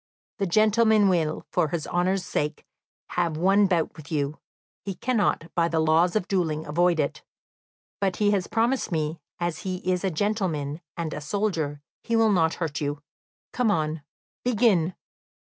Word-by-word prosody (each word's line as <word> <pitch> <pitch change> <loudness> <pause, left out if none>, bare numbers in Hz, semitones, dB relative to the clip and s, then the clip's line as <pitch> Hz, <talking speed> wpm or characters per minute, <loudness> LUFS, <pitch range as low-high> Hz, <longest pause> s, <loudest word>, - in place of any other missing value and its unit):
"The 195 - +1
gentleman 215 +1 +4
will, 160 -4 0
for - - +2
his 155 +1 -3
honour's 180 +1 0
sake, 150 -3 -2 0.4
have 170 -3 -1
one 195 +4 +4
bout 175 -4 0
with 155 0 -12
you; 145 -1 -1 0.4
he 195 -2 -4
cannot, 205 -9 0
by 170 -1 +2
the 165 -1 0
laws 160 +4 +3
of 210 -3 0
duelling, 160 -6 0
avoid 170 +2 +2
it; 145 - -1 0.8
but 195 -2 0
he 205 -1 +2
has 195 -3 0
promised 230 +1 0
me, 155 0 -1 0.2
as 175 -2 -2
he 185 -1 -3
is 180 0 +1
a 190 - +2
gentleman 170 -5 -1 0.2
and 165 -2 -3
a 150 - -5
soldier, 160 -5 -2 0.2
he 230 - -1
will 225 -1 +4
not 165 -4 +2
hurt 155 -4 -3
you. 145 0 -3 0.5
Come 245 -2 +1
on; 155 -4 0 0.4
begin!" 210 -8 +2
175 Hz, 165 wpm, -26 LUFS, 155-205 Hz, 0.8 s, gentleman